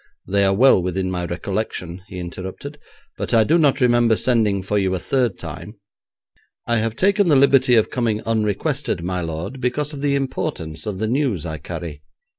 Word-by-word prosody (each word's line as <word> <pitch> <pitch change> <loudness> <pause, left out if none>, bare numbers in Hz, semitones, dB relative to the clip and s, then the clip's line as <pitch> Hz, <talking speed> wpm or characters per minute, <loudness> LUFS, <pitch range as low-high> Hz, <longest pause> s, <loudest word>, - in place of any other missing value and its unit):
'They 100 +1 +1
are 95 0 +3
well 125 -3 +5
within 95 +1 -2
my 90 -1 -2
recollection,' 90 0 -4
he 95 - -9
interrupted, 95 - -7 0.4
'but - - -1
I 110 - +6
do 165 +8 +3
not 145 -3 +3
remember 120 -3 +4
sending 110 -6 +1
for 105 +2 0
you 95 -1 0
a - - -3
third 120 -6 0
time.' 85 +7 -8 0.9
'I 120 - +1
have 110 0 -1
taken 200 - +2
the 155 - +4
liberty 135 -2 +5
of 110 - +3
coming 115 -4 0
unrequested, 110 - -1
my 90 0 -2
lord, 85 +10 -5
because 145 +4 -1
of 140 - -7
the 140 -1 +1
importance 130 - -3
of 100 -3 -3
the 110 +3 -1
news 120 - 0
I 80 -2 -5
carry. 75 0 -7
110 Hz, 185 wpm, -21 LUFS, 90-135 Hz, 0.9 s, I